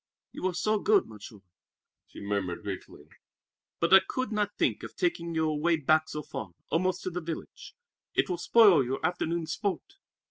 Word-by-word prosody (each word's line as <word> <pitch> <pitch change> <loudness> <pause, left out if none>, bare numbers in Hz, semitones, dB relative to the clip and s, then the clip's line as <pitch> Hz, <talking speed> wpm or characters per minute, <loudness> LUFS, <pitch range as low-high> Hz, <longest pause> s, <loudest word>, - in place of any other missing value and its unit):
"You 185 - -3
are 180 - -3
so 215 +3 +1
good, 205 -1 +3
Monsieur," 105 -1 -12 0.7
she - - -12
murmured 100 -4 -3
gratefully. 95 -6 -7 0.7
"But 170 - +2
I 195 - +11
could 255 +3 -4
not 210 -1 -1
think - - +1
of - - -9
taking 170 - -1
you 160 0 +1
away 155 +2 +1
back 155 +1 +2
so 150 - -5
far, 95 -10 -7 0.2
almost 185 +2 0
to 185 - -3
the 180 +1 -4
village. 165 0 -8 0.4
It - - +2
will 180 -3 -3
spoil 200 - +6
your 130 +5 -3
afternoon's 170 -1 -1
sport." 205 - -4
170 Hz, 175 wpm, -29 LUFS, 135-190 Hz, 0.7 s, I